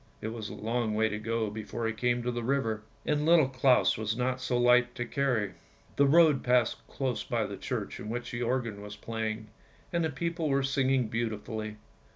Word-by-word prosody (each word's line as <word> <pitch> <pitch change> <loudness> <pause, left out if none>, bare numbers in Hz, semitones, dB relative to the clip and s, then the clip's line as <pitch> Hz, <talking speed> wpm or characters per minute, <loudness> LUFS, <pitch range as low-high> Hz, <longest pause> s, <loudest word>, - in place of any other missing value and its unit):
" - - -32
It 110 - -3
was 110 -2 -5
a - - -7
long 115 0 -1
way 110 0 +2
to 105 - -3
go 110 -1 -1
before 110 +2 -4
he 115 - 0
came 120 +1 0
to 125 - 0
the 120 0 -3
river, 115 -4 0 0.2
and 150 -1 +1
Little 160 -3 +5
Claus 130 -3 +3
was 110 +1 -1
not 130 +1 -1
so 125 -1 0
light 125 0 +4
to 120 - -3
carry. 120 -6 0 0.4
The 140 - +4
road 155 -2 +5
passed 125 -2 +3
close 130 -3 -2
by - - -1
the - - -5
church - - -4
in 105 - -6
which 120 +1 -4
the 120 - -4
organ 115 -4 -1
was 105 0 -8
playing, 110 0 -4 0.4
and 170 -1 +2
the 160 - +1
people 165 +2 -2
were 135 0 +2
singing 135 -2 +2
beautifully. 110 -1 -3
120 Hz, 205 wpm, -30 LUFS, 110-135 Hz, 0.4 s, Little